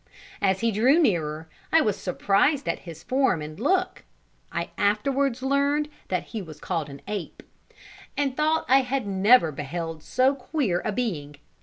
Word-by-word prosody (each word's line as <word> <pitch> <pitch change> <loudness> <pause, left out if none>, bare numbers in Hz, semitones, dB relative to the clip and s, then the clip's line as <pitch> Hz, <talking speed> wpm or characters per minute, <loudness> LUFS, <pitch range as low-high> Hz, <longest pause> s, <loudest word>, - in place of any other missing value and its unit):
As 190 -1 +2
he 230 0 +2
drew 245 +9 +4
nearer, 160 - 0 0.2
I 325 - +6
was 210 -7 +1
surprised 200 - +1
at - - -1
his 160 0 -10
form 260 - +2
and 155 +3 -8
look 370 - 0 0.5
(I 170 0 -3
afterwards 255 +5 +1
learnt 280 +2 +1 0.2
that 185 -2 -1
he 220 - -3
was 155 -5 -10
called 165 -4 -3
an 140 0 -10
ape), 205 -4 -5 0.7
and 275 -3 0
thought 310 +2 +1
I 265 +1 +6
had 260 -1 -2
never 195 -2 +4
beheld 160 +3 -5
so 255 - +2
queer 255 - -1
a 215 - -1
being. 175 -11 -3
210 Hz, 160 wpm, -25 LUFS, 170-275 Hz, 0.7 s, I